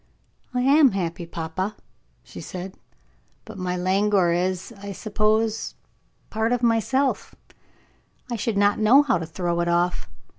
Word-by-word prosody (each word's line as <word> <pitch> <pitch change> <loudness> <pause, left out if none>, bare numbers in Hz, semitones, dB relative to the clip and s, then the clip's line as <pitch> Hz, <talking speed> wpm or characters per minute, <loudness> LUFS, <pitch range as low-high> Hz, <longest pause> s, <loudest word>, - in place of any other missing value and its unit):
"I 250 -1 -1
am 275 -1 +5
happy, 175 -2 -3
papa," 170 +5 -4 0.5
she - - -10
said; 185 +1 -7 0.7
"but 220 -4 -10
my 180 0 -2
languor 190 0 +2
is, 185 +4 -2
I 200 0 -6
suppose, 215 +2 0 0.6
part 220 +1 0
of 245 0 0
myself 250 +4 +1 1.0
I - - 0
should 225 -1 -2
not 205 +1 +3
know 240 +7 +6
how 245 -11 +1
to 165 - -5
throw 170 +1 -2
it 170 - 0
off. 175 +1 0
200 Hz, 140 wpm, -24 LUFS, 180-225 Hz, 1.0 s, know